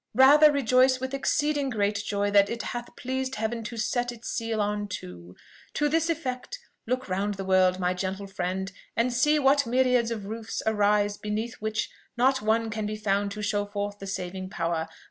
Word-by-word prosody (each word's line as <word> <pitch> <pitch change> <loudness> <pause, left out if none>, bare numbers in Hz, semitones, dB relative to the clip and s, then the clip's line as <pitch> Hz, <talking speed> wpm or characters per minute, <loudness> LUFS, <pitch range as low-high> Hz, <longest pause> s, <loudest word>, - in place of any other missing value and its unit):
Rather 295 +4 +8
rejoice 255 -1 +3
with 260 +1 -4
exceeding 290 0 0
great 205 -3 0
joy 205 0 -1
that 200 -1 +5
it 235 +1 -3
hath 240 0 -6
pleased 260 +1 -3
Heaven 225 +1 -2
to 235 - -6
set 245 +2 0
its 235 -1 -8
seal 225 -1 -2
on 205 0 -1
two. 90 - -8 0.4
To 295 - +2
this 325 +2 +1
effect, 265 -6 -3 0.3
look 255 +2 -1
round 200 +2 -1
the 195 0 -5
world, 185 -1 +3
my 180 0 +1
gentle 190 +2 -3
friend, 190 0 -3 0.3
and 240 +2 +2
see 295 +5 +3
what 280 -2 +3
myriads 250 -1 +3
of 220 -4 -4
roofs 225 +2 -5
arise 205 -1 +2
beneath 215 +2 -3
which 215 0 -1 0.3
not 260 +2 +3
one 220 +1 +1
can 210 -1 -2
be 215 - -3
found 205 -1 0
to 210 0 -6
show 205 0 0
forth 205 0 -4
the 195 - -7
saving 185 0 -4
power. 165 -2 -2
215 Hz, 185 wpm, -27 LUFS, 200-255 Hz, 0.4 s, Rather